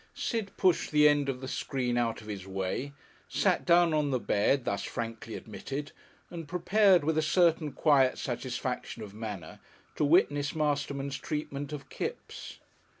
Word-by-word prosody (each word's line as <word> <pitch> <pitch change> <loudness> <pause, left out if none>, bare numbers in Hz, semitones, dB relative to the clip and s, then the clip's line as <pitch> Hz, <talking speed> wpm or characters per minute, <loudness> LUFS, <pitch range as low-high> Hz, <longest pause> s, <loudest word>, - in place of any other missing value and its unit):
Sid 225 -5 -2
pushed 185 -3 +2
the 150 0 +6
end 145 -1 +3
of 130 -1 -3
the 130 - -5
screen 125 -2 -2
out 115 -2 0
of 105 - -13
his 100 -3 -6
way, 95 +8 -3 0.4
sat - - +1
down 170 -1 +5
on 150 -2 +1
the 130 - +1
bed 120 +5 +1
thus 100 -1 -1
frankly 115 -1 -5
admitted, 140 +6 -6 0.4
and 165 -3 -7
prepared, 185 +1 +4
with 160 +1 +1
a - - +3
certain 165 -1 +3
quiet 135 -2 +3
satisfaction 125 -2 -4
of 100 -2 -9
manner, 105 -7 -7 0.4
to - - +1
witness 145 -2 +3
Masterman's 140 -2 -1
treatment 145 -1 -4
of 145 -2 -7
Kipps. - - -6
140 Hz, 155 wpm, -30 LUFS, 120-155 Hz, 0.4 s, the